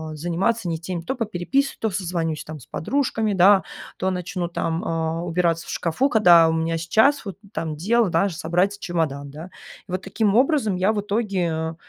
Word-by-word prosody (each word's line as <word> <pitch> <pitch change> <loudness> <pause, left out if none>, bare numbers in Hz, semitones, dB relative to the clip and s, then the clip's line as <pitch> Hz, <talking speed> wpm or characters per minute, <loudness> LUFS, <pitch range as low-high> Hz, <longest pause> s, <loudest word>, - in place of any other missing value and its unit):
заниматься 175 +6 -1
не 160 -1 -2
теми: 175 0 -5
то 265 +11 -3
попереписываюсь, 225 +5 -1
то 220 - +1
созвонюсь 170 -4 -2
там 155 -1 -8
с - - -15
подружками, 225 - -1
да, 190 +2 +5 0.3
то 190 - 0
начну 180 0 -3
там, 165 0 -2
а, 165 0 -2
убираться 170 -1 0
в - - -5
шкафу, 175 - 0
когда 175 -7 +6
у - - 0
меня 165 0 -1
сейчас 220 - +2
вот 195 -2 -6 0.2
там 160 -2 -3
дело, 215 +5 +2
даже 170 +1 +1
собрать 180 +5 0
чемодан, 150 -6 -2
да. 160 +5 -9 0.4
И - - -11
вот 185 +1 -3
таким 205 +1 0
образом 255 - +2
я 190 +4 +2
в 205 - -1
итоге 180 -7 -1
180 Hz, 180 wpm, -23 LUFS, 165-210 Hz, 0.4 s, когда